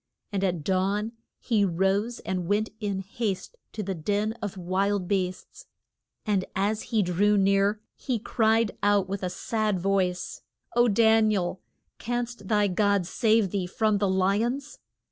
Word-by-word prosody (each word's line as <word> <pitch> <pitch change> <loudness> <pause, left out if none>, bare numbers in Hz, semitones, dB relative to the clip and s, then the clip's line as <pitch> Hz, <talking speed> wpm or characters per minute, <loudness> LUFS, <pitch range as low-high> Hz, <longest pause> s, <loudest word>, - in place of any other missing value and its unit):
And 195 -1 -1
at 175 -5 0
dawn 195 +5 0 0.3
he 220 -5 +1
rose 195 +6 +1
and 180 -2 -3
went 210 +2 +1
in 200 -3 -2
haste 200 - -4 0.2
to 215 - -4
the 195 0 -2
den 205 +6 -1
of 205 -2 -4
wild 190 +1 0
beasts. 185 - -3 0.6
And 205 -4 +1
as 205 +3 0
he 220 -3 +2
drew 200 +4 +2
near 200 +2 +3 0.2
he 255 -4 -2
cried 225 0 +1
out 205 -2 +3
with 195 +1 -4
a 180 - -1
sad 215 +1 -1
voice, 185 -1 -1 0.3
O 240 0 +5
Dan 220 0 +4
i - - +2
el, 180 -1 -2 0.4
canst 240 -3 -3
thy 210 -1 +3
God 200 0 +2
save 215 +1 +2
thee 190 -3 -1
from 215 +2 +1
the 200 -1 +1
li 190 +3 +2
ons? 270 +4 -4
200 Hz, 160 wpm, -27 LUFS, 190-220 Hz, 0.6 s, O